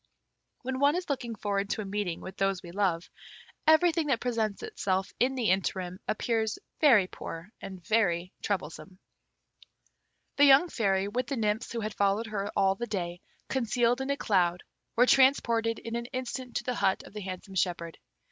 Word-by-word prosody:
When 260 +1 -3
one 285 +3 +4
is 360 -4 -2
looking 240 -4 -3
forward 200 -1 -2
to 215 - -1
a - - -5
meeting 195 -3 -3
with 190 - -8
those 195 -1 0
we 170 - -9
love, 180 -3 0 0.6
everything 320 0 +4
that 260 -5 +2
presents 225 -4 -1
itself 190 0 -2
in 260 +2 +2
the 235 -7 +2
interim 185 -1 -1
appears 220 0 0 0.2
very 245 - +6
poor 170 +1 -8
and 185 -3 -9
very 180 -5 +1
troublesome. 185 -2 -4 1.4
The 285 - +7
young 280 +5 +7
Fairy, 195 -6 +1
with 245 +4 -2
the 275 - -2
nymphs 215 +1 -1
who 235 - -3
had 215 -1 -3
followed 200 +3 +1
her 205 -2 -3
all 190 0 +3
the 235 +5 -5
day, 175 -4 -4 0.3
concealed 245 0 +1
in 265 - -3
a 280 - +1
cloud, 180 -6 +1 0.3
were 245 - +6
transported 235 -4 +3
in 230 0 -6
an 235 0 -3
instant 255 0 -5
to - - -1
the 250 - -1
hut 195 -4 +1
of - - -14
the 210 - -6
handsome 190 +1 -7
shepherd. 170 -3 -2
215 Hz, 175 wpm, -29 LUFS, 190-245 Hz, 1.4 s, The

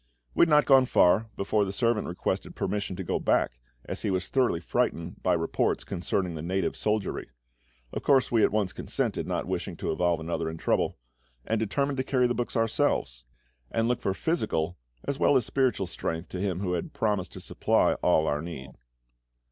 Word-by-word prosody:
We - - +2
had 170 - +6
not 150 -1 +5
gone 135 -2 +6
far 100 +4 +4
before 105 +2 +1
the 95 - -2
servant 115 +2 +1
requested 90 - -3
permission 105 -2 -2
to 95 - -5
go - - -1
back, - - +1 0.3
as - - -5
he - - -1
was 95 -1 -1
thoroughly 125 -10 +2
frightened 85 0 -2
by 90 - +2
reports 80 -1 0
concerning 90 -1 -2
the 80 - -5
native 90 +2 -1
soldiery. 105 -2 -1 0.6
Of - - -3
course 135 -2 +3
we 115 -2 +4
at - - +4
once 105 -3 0
consented, - - -2
not - - -1
wishing - - -3
to - - -2
involve 85 0 +1
another 80 0 -2
in 80 - -6
trouble, - - 0 0.5
and 110 0 0
determined 140 +6 0
to 130 - 0
carry 130 -1 +2
the 120 - +2
books 120 0 -2
ourselves, 60 - 0 0.4
and 115 0 0
look 125 0 0
for 95 - -1
physical 90 - -1 0.3
as 140 - -3
well 140 - +5
as 125 - 0
spiritual 130 -7 +1
strength 80 -1 -4
to 90 - -5
Him 95 -2 -1
who 90 -3 -1
had 85 - -3
promised 105 -6 -1
to - - -8
supply - - +2
all 80 - +3
our 75 -1 0
need. 70 -5 -7
95 Hz, 195 wpm, -28 LUFS, 85-120 Hz, 0.6 s, had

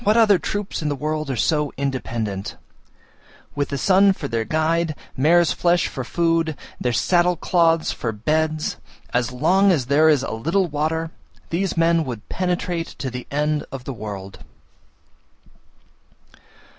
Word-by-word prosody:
What 215 +1 +3
other 210 -5 +5
troops 205 +5 -3
in 150 - -1
the 145 - -1
world 155 +1 -3
are 135 - -1
so 150 +5 +1
independent? 115 -7 -3 1.0
With 145 0 -2
the 140 - -2
sun 195 +4 +4
for - - -5
their 115 -1 -2
guide, 160 +4 0 0.2
mare's 170 +5 +4
flesh 175 0 +2
for 130 - -5
food, 165 +1 0 0.2
their 125 - 0
saddle 175 - +2
cloths 165 -1 +2
for 115 - -3
beds, 155 +8 -1 0.4
as 120 0 +1
long 190 +10 +3
as 145 -8 +1
there 150 +5 +4
is 145 -4 +3
a - - -4
little 165 - 0
water, 160 +1 -2 0.4
these 180 +1 -1
men 165 0 +3
would 120 -4 -6
penetrate 180 -2 -2
to 130 -1 -4
the 125 0 -7
end 150 +1 0
of 135 -2 -7
the 135 - -5
world. 100 -4 -7
155 Hz, 150 wpm, -22 LUFS, 130-170 Hz, 1.0 s, other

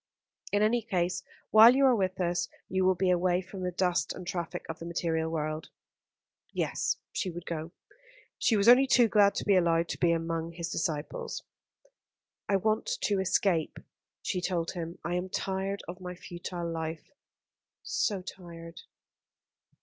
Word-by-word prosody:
In 205 +1 +3
any 235 +3 +3
case, 180 -5 -1 0.3
while 225 +3 +9
you 275 0 +4
are 255 -2 +5
with 190 -3 -1
us 175 -1 0 0.2
you 190 0 +1
will 185 0 +4
be 185 +1 +2
away 180 0 +2
from 185 +1 -8
the 180 - -1
dust 180 0 0
and 180 - -8
traffic 175 -2 -4
of 165 - -6
the 165 - -7
material 165 -1 -1
world." 155 -1 -3 0.8
Yes, - - -1
she 195 - -2
would 175 0 -7
go, 165 0 -4 0.7
she 225 - +3
was 200 +2 +2
only 255 +3 +8
too 245 -3 +5
glad 205 -2 +4
to - - -2
be 200 - +4
allowed 170 -2 +3
to - - -4
be 170 - +4
among 165 0 -2
his 170 0 -5
disciples. 155 -2 -3 1.1
"I 200 - +3
want 215 - +1 0.2
to 200 -2 +2
escape," 185 -3 +1 0.5
she 180 - -1
told 175 -2 -1
him. 170 -1 -6
"I 175 - -1
am 180 +1 -2
tired 195 +1 -2
of 180 +2 -8
my 180 0 -6
futile 175 0 -6
life 160 0 -5 0.7
so 200 -4 -1
tired." 170 -3 -10
180 Hz, 165 wpm, -29 LUFS, 170-195 Hz, 1.1 s, while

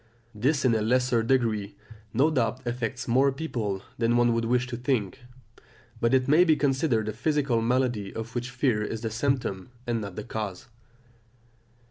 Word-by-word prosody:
This 135 +6 +1
in 125 - +4
a 110 - +1
lesser 125 +1 +2
degree 110 -5 0 0.4
no 140 +9 +3
doubt 125 -2 -1
affects 120 +1 -3
more 130 +4 +4
people 115 -10 -3 0.2
than 120 +1 +2
one 120 -1 +4
would 115 0 0
wish 125 +2 +1
to 125 -1 -5
think; 120 -4 -1 0.8
but 115 - +2
it 130 -1 +3
may 155 +5 +6
be 160 -3 +4
considered 135 -6 +1
a 110 - -2
physical 135 -1 +1
malady 120 -4 0
of 115 +1 -6
which 120 0 -3
fear 125 -5 +1
is 110 +1 -4
the 115 -1 -3
symptom 115 -5 -1 0.2
and 120 -2 -1
not 100 -3 -6
the 105 - -5
cause. 105 -2 -5
120 Hz, 170 wpm, -27 LUFS, 110-130 Hz, 0.8 s, may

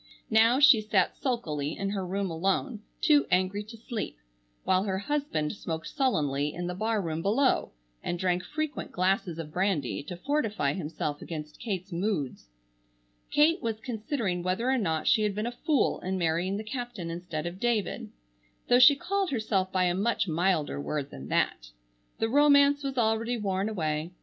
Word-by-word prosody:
Now 225 +4 +5
she 285 -6 +7
sat 210 -4 +1
sulkily 160 - -2
in 195 0 -2
her 195 -2 -2
room 190 0 -2
alone, 195 - -1 0.2
too 295 -2 +4
angry 185 +3 +1
to 230 +2 -11
sleep; 220 - -5 0.5
while 185 0 +3
her 190 -2 -1
husband 200 - -1
smoked 165 -5 -5
sullenly 150 - 0
in 175 - -4
the 180 - -3
barroom 190 -6 -1
below, 235 - +2 0.3
and 175 - -2
drank 180 0 0
frequent 310 0 -4
glasses 185 -2 0
of 155 -2 -7
brandy 185 -8 0
to 175 - -6
fortify 220 - 0
himself 150 -3 -4
against 155 -2 -7
Kate's 195 -4 -4
moods. 170 - -2 0.8
Kate 320 +4 +4
was 225 -2 -2
considering 220 -5 -2
whether 185 +8 0
or 265 - +2
not 160 -7 -1
she 215 - +5
had 210 -2 0
been 210 +1 -2
a 240 - -2
fool 295 +3 +1
in 190 +1 -2
marrying 175 +3 0
the 215 - -4
captain 225 -6 -5
instead 170 -2 -5
of 175 +2 -5
David, 235 -3 -1 0.6
though 245 - +6
she 270 +3 +9
called 390 +5 -1
herself 215 -7 0
by 185 -1 +2
a 175 -1 +2
much 205 +2 0
milder 165 - 0
word 140 - -3
than 65 - -9
that. - - 0 0.5
The 225 - 0
romance 285 +2 +5
was 270 -1 -3
already 230 +1 +1
worn 195 -1 -1
away. 160 -4 -2
195 Hz, 170 wpm, -28 LUFS, 170-235 Hz, 0.8 s, she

